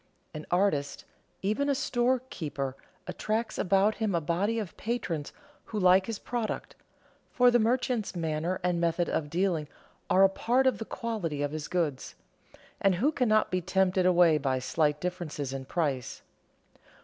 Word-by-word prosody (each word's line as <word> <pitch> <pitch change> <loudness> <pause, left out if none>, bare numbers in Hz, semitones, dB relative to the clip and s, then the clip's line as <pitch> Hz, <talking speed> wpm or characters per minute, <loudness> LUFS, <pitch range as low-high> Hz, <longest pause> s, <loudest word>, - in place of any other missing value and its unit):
An 155 0 -7
artist, 175 -6 0 0.4
even 215 +9 0
a 280 - +2
storekeeper, 240 - -1 0.3
attracts 220 +2 -2
about 195 +3 +3
him 215 -4 -1
a - - +3
body 180 +8 0
of 210 -6 -4
patrons 180 -10 -3 0.3
who 215 - -4
like 185 0 +5
his 225 -2 -3
product 235 -1 -4 0.5
(for 250 0 +4
the 240 - +4
merchant's 240 -2 0
manner 165 +2 -2
and 175 -1 0
method 170 +1 +1
of 145 -2 -2
dealing 170 -2 0 0.4
are 190 +1 +5
a - - +8
part 245 +7 +1
of 260 - +2
the 225 - -4
quality 180 -14 -3
of 145 - -1
his 155 0 -5
goods), 160 -7 -2 0.6
and 195 -2 +3
who 265 - +2
cannot 215 -7 +2
be 185 0 0
tempted 185 0 +2
away 175 -4 +5
by 135 -2 0
slight 150 +3 0
differences 170 -6 -4
in 135 -1 -5
price. 140 -6 -2
185 Hz, 155 wpm, -29 LUFS, 155-220 Hz, 0.6 s, a